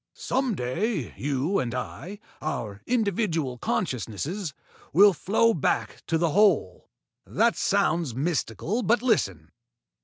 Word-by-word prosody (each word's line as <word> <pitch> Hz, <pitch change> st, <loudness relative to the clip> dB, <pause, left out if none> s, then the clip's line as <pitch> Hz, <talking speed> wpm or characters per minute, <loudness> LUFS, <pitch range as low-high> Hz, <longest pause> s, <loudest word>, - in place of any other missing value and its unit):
Some 260 Hz, -4 st, -1 dB
day 160 Hz, -, -2 dB
you 145 Hz, +7 st, 0 dB
and 125 Hz, -1 st, -2 dB
I 180 Hz, +9 st, -6 dB, 0.2 s
our 110 Hz, -9 st, -4 dB
individual 190 Hz, -, 0 dB
consciousnesses 175 Hz, -, -2 dB, 0.4 s
will 200 Hz, +5 st, +7 dB
flow 225 Hz, +5 st, +2 dB
back 150 Hz, -, -1 dB
to 165 Hz, -, +1 dB
the 165 Hz, -1 st, +1 dB
Whole. 185 Hz, -, +2 dB, 0.4 s
That -, -, +2 dB
sounds 155 Hz, -7 st, +1 dB
mystical, 160 Hz, -, -1 dB
but 230 Hz, +2 st, +2 dB
listen. 95 Hz, -, 0 dB
170 Hz, 115 wpm, -26 LUFS, 130-210 Hz, 0.4 s, will